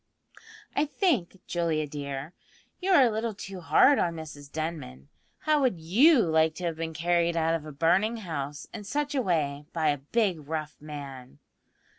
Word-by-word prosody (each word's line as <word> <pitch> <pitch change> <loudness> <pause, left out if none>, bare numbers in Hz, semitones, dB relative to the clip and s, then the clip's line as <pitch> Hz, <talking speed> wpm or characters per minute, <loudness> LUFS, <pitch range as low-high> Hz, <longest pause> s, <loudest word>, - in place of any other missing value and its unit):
"I 290 - +3
think, 265 - 0
Julia 165 -3 0
dear, 140 +1 -6 0.5
you 380 - -3
are 335 -8 +7
a 240 - +3
little 220 0 -2
too 195 -2 -7
hard 270 - +5
on 170 -1 0
Mrs 150 -3 -9
Denman. 155 - -5 0.3
How 305 -1 +2
would 245 -10 +1
you 235 - +5
like 160 -2 +2
to 180 - -7
have 170 -2 -1
been 160 0 -5
carried 170 +1 +1
out 165 0 +2
of 160 -2 -3
a - - -7
burning 185 +10 +2
house 150 -8 -5
in 220 - -6
such 290 +8 -2
a 270 - +1
way 150 - -1
by 160 -2 +1
a 145 - +1
big 170 - -1
rough 155 -1 -4
man?" 140 - -9
165 Hz, 175 wpm, -28 LUFS, 150-210 Hz, 0.5 s, are